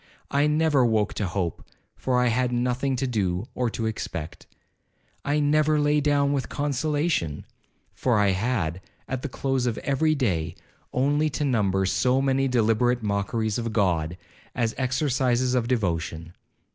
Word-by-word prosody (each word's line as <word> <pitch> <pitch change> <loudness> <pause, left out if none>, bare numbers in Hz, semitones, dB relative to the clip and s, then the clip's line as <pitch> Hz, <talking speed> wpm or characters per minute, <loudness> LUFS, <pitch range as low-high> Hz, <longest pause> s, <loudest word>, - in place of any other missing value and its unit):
I 145 +1 +3
never 150 -3 +3
woke 110 -3 +1
to 105 - -2
hope, 85 -2 -3 0.3
for 125 -1 0
I 125 -1 +3
had 125 +2 +1
nothing 125 +2 0
to 130 - -1
do 100 -6 -1
or 125 -1 0
to 115 0 -3
expect. 85 -7 -5 0.8
I 145 +1 +1
never 150 +1 +3
lay 150 0 +2
down 145 -1 +2
with 135 -2 -2
consolation, 145 - -1 0.5
for 125 -4 +1
I 100 -1 +3
had, 95 -4 -1 0.3
at 130 -1 -3
the 145 - -4
close 130 -1 -1
of 115 - -1
every 155 +3 +2
day, 85 - -1 0.4
only 145 +4 +2
to 150 +1 -2
number 100 -7 +1
so 125 +7 +2
many 135 0 +2
deliberate 120 0 +2
mockeries 105 +2 -1
of 115 -1 -3
God, 90 -5 +1 0.4
as 115 -1 0
exercises 130 -1 +1
of 120 -2 +1
devotion. 85 -7 -2
125 Hz, 150 wpm, -25 LUFS, 105-140 Hz, 0.8 s, I